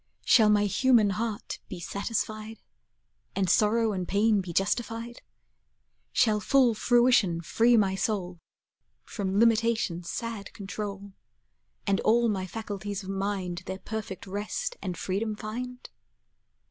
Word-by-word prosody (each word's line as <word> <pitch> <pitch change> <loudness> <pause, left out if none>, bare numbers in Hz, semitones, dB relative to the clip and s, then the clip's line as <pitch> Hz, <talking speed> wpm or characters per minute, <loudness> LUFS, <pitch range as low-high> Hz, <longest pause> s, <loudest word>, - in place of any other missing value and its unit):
Shall 220 -4 +6
my 205 -1 +4
human 220 0 +4
heart 215 0 -4
be 185 - -6
satisfied, 215 +3 -3 0.8
And 195 -1 +1
sorrow 215 +4 +3
and 185 -2 -3
pain 205 +1 +3
be 180 -2 -7
justified? 230 +5 -2 0.9
Shall 215 -2 +3
full 255 +1 +4
fruition 240 -6 +3
free 230 +7 +3
my 195 -3 +3
soul 190 -3 -2 0.6
From 195 -2 -2
limitation's 225 -6 +2
sad 230 -3 -5
control, 200 -1 -6 0.7
And 200 -1 +2
all 235 +1 +3
my 190 -3 -2
faculties 205 -1 -5
of 190 - -8
mind 195 -2 -2
Their 190 - -4
perfect 210 -2 -6
rest 210 - -3
and 180 -3 -4
freedom 210 +5 -2
find? 245 +4 -6
210 Hz, 120 wpm, -28 LUFS, 195-230 Hz, 0.9 s, Shall